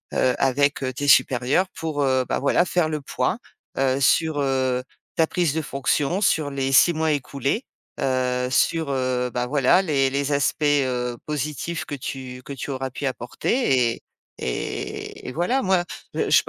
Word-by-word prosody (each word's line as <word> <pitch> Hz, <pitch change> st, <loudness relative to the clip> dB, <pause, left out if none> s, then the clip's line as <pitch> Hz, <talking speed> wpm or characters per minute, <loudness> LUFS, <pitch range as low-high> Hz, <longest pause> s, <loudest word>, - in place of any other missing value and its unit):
heu, 130 Hz, -, +3 dB
avec, 140 Hz, +2 st, +2 dB
heu, 130 Hz, -1 st, -1 dB
tes 145 Hz, +3 st, -3 dB
supérieurs 135 Hz, +7 st, +4 dB
pour, 155 Hz, -3 st, -3 dB
heu, 130 Hz, -2 st, +2 dB
bah, -, -, -1 dB
voilà 145 Hz, +5 st, +3 dB
faire 175 Hz, -2 st, +1 dB
le 155 Hz, -1 st, -3 dB
point, 135 Hz, +6 st, -1 dB, 0.4 s
heu, 135 Hz, 0 st, +2 dB
sur, 155 Hz, +3 st, +3 dB
heu, 130 Hz, -2 st, +1 dB, 0.3 s
ta 160 Hz, -, +3 dB
prise 170 Hz, -4 st, 0 dB
de 160 Hz, -, -1 dB
fonction 140 Hz, +5 st, 0 dB
sur 155 Hz, -7 st, +2 dB
les 135 Hz, -1 st, -2 dB
6 170 Hz, +6 st, +6 dB
mois 160 Hz, 0 st, +1 dB
écoulés, 140 Hz, -, -2 dB, 0.4 s
heu, 125 Hz, -1 st, 0 dB
sur, 160 Hz, +4 st, +1 dB
heu, 130 Hz, -2 st, 0 dB
bah 125 Hz, 0 st, -1 dB
voilà 135 Hz, +6 st, +3 dB
les 140 Hz, -6 st, +2 dB
les 140 Hz, +2 st, -1 dB
aspects, 140 Hz, +2 st, +1 dB
heu, 130 Hz, -4 st, +1 dB
positifs 150 Hz, +3 st, -3 dB
que -, -, -7 dB
tu 130 Hz, -2 st, -6 dB
que 140 Hz, -, -7 dB
tu 140 Hz, +1 st, -5 dB
auras 135 Hz, 0 st, -3 dB
pu 130 Hz, +3 st, -6 dB
apporter 130 Hz, -, 0 dB
et -, -, -19 dB, 0.4 s
et 60 Hz, -, -5 dB
et -, -, -4 dB
voilà 180 Hz, -, +1 dB
moi 190 Hz, -4 st, +2 dB, 0.3 s
je -, -, +4 dB
140 Hz, 170 wpm, -23 LUFS, 130-155 Hz, 0.4 s, 6